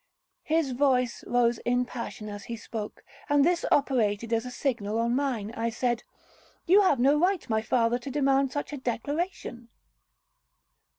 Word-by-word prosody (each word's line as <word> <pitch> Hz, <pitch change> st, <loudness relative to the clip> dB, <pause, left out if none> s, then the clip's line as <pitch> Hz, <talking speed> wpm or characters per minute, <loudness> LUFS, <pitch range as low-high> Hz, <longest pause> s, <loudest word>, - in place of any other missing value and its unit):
'—His 315 Hz, -3 st, +1 dB
voice 250 Hz, -2 st, +1 dB
rose 240 Hz, -1 st, +2 dB
in 245 Hz, +1 st, +1 dB
passion 235 Hz, -3 st, -6 dB
as 205 Hz, -1 st, -7 dB
he 235 Hz, -, -5 dB
spoke, 215 Hz, -1 st, -7 dB, 0.3 s
and 290 Hz, -1 st, +4 dB
this 345 Hz, 0 st, +2 dB
operated 230 Hz, -5 st, +1 dB
as 230 Hz, +2 st, 0 dB
a -, -, -5 dB
signal 230 Hz, -5 st, -2 dB
on 235 Hz, +1 st, +1 dB
mine. 250 Hz, -7 st, -1 dB
I 230 Hz, +1 st, -1 dB
said, 240 Hz, 0 st, -1 dB, 0.6 s
'You 390 Hz, +4 st, +6 dB
have 370 Hz, -8 st, +3 dB
no 280 Hz, +4 st, +4 dB
right, 365 Hz, -1 st, +1 dB
my 220 Hz, -2 st, +1 dB
father, 235 Hz, +1 st, +1 dB
to 250 Hz, -, -7 dB
demand 275 Hz, -1 st, +2 dB
such 290 Hz, +1 st, -4 dB
a -, -, -3 dB
declaration.' 260 Hz, -1 st, -4 dB
250 Hz, 160 wpm, -27 LUFS, 230-285 Hz, 0.6 s, You